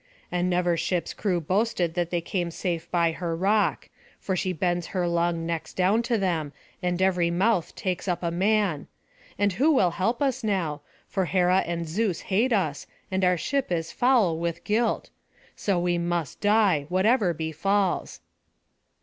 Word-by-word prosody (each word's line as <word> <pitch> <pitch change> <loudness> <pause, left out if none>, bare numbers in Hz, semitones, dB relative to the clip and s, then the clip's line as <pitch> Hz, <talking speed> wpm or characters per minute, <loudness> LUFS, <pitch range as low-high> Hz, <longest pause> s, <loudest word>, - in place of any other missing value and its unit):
And 180 0 0
never 175 -1 +2
ship's 175 +1 -1
crew 185 -4 0
boasted 185 0 0
that 175 -1 -1
they 175 -1 -1
came 175 0 -2
safe 170 0 -3
by 170 -2 +2
her 165 0 -3
rock; 200 +5 +1 0.3
for 190 - -2
she 185 +1 -1
bends 175 0 -1
her 175 -1 +1
long 170 -1 0
necks 165 -1 -4
down 190 +5 +3
to 235 - +3
them, 165 -7 -1 0.3
and 180 -1 -1
every 180 -2 +2
mouth 180 0 +1
takes 185 0 -3
up 180 -1 -1
a 170 - 0
man 195 -3 +1 0.5
And 205 -1 +2
who 275 - +3
will 190 - +3
help 225 +7 -1
us 265 -3 0
now? 175 -9 -1 0.3
For 190 -2 -1
Hera 180 +1 +3
and 170 -1 -3
Zeus 190 +1 -1
hate 220 +7 +1
us, 160 - 0 0.2
and 190 0 0
our 180 -1 +3
ship 275 - -1
is 165 -2 -1
foul 230 -10 +3
with 170 0 -3
guilt; 225 +2 0 0.4
so 200 -3 0
we 175 0 0
must 170 -4 -2
die, 205 -9 +3
whatever 195 +2 +3
befalls." 175 +5 -1
180 Hz, 165 wpm, -26 LUFS, 170-200 Hz, 0.5 s, down